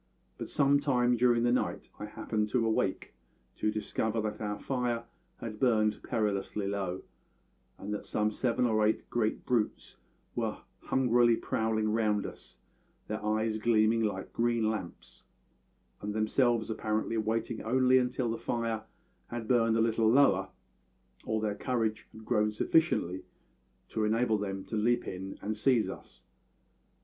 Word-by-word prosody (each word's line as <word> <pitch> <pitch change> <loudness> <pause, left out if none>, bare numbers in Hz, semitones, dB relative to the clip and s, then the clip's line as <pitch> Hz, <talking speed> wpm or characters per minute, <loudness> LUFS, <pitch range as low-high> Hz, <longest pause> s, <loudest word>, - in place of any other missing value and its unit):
But - - -5
some 140 0 +3
time 125 -4 +2
during 120 0 +3
the 120 - +3
night 125 - -1
I 105 - -4
happened 105 0 -2
to 115 +1 +1
awake, 110 -4 -1 0.4
to 110 - +1
discover 110 +1 -1
that 105 0 -4
our 105 -1 -2
fire 120 -1 -1 0.3
had 110 -2 -7
burned 110 -4 +2
perilously 105 -2 -1
low, 95 -2 -3 0.7
and 105 +1 -5
that 105 - -5
some 105 0 0
seven 125 +2 0
or 110 -2 +2
eight 110 +1 +1
great 110 -2 0
brutes 115 -4 -1 0.4
were - - -2 0.3
hungrily 120 -2 +4
prowling 110 -1 0
round 105 -2 +1
us, - - -10 0.5
their 105 0 -4
eyes 110 +1 0
gleaming 110 0 +3
like 100 -3 -2
green 115 -2 +1
lamps, 100 -6 -8 0.8
and 105 0 -4
themselves 115 +1 +2
apparently 110 +1 -1
waiting 110 +1 -1
only 130 +2 +4
until 125 -1 -1
the 115 - -3
fire 115 -1 -2 0.4
had 120 -2 -5
burned 115 -2 +3
a - - +3
little 115 -1 +3
lower, 110 -7 +4 0.8
or 110 0 0
their 105 -1 -1
courage 110 0 -2
had 110 0 -13
grown 105 0 +2
sufficiently 105 - +1 0.7
to 110 - -1
enable 110 0 +2
them 95 -1 -4
to - - -5
leap 120 +3 +1
in 95 +1 -6
and 110 +1 -2
seize 115 +1 +2
us. - - -13
110 Hz, 145 wpm, -30 LUFS, 105-120 Hz, 0.8 s, hungrily